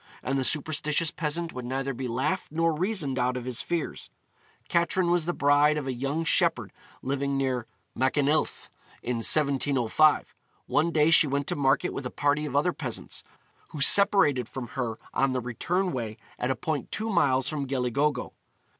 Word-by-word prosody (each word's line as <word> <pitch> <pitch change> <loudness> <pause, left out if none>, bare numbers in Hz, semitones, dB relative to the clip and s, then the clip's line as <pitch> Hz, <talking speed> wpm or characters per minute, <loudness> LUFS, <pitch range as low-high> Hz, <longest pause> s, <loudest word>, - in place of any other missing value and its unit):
And 135 +3 -1
the - - 0
superstitious 150 +2 0
peasant 165 +2 -3
would 125 - -6
neither 135 +2 -3
be 125 +1 -5
laughed 130 +11 -2
nor 165 +1 +1
reasoned 155 - -1
out 125 +1 0
of 125 - -6
his 125 -2 -3
fears. 170 -3 -3 0.6
Catrin 170 +1 +1
was 175 -2 +2
the - - +2
bride 145 +1 +3
of 150 - -3
a 130 - -2
young 140 +6 -2
shepherd - - +1 0.3
living 140 +1 -1
near 130 -3 -1 0.3
Machynlleth 145 +4 0 0.3
in 120 0 -2
1705. 140 +2 +2 0.3
One 160 +3 +1
day 155 -1 +3
she 160 - +7
went 140 0 -1
to - - -2
market 135 -2 +1
with 130 - -4
a - - -7
party 145 +2 0
of 140 - -6
other 155 +5 +2
peasants, 130 -7 -4 0.4
who 150 - -9
separated 145 - +5
from 125 -3 -6
her 120 -4 -3 0.2
on 135 -1 +1
the 130 - 0
return 175 +10 -2
way 115 -4 -4 0.2
at 125 - -1
a 130 - +1
point 155 -3 -4
two 220 +1 -3
miles 135 -7 +2
from 145 -2 -2
Gelli 125 -2 -1
Gogo. 145 +2 0
140 Hz, 175 wpm, -27 LUFS, 130-155 Hz, 0.6 s, she